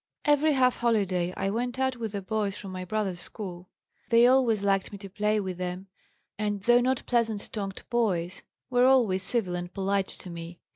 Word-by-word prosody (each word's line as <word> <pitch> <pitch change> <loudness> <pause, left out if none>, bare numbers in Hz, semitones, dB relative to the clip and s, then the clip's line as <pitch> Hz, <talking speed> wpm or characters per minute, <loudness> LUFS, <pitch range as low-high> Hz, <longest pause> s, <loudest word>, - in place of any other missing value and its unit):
"Every 295 +1 +4
half 255 -2 +3
holiday 195 -7 +1
I 195 - -1
went 245 +3 -2
out 260 -1 0
with 225 -3 -4
the 200 -1 -4
boys 205 0 -2
from 195 - -8
my 185 0 -5
brothers' 190 -2 -2
school. 180 -3 -8 0.4
They 235 0 +6
always 245 -5 +4
liked 195 -1 +1
me 205 - -7
to 195 0 -10
play 210 +2 +1
with 185 -3 -4
them, 180 +1 -4 0.5
and, 205 -2 -2
though 240 +2 +5
not 255 +1 0
pleasant 225 -4 0
tongued 195 -3 -5
boys, 185 -7 0 0.3
were 245 0 +5
always 230 -8 +4
civil 200 -2 0
and 175 0 -5
polite 195 0 0
to 180 - -5
me. 170 0 -8
205 Hz, 190 wpm, -27 LUFS, 185-240 Hz, 0.5 s, They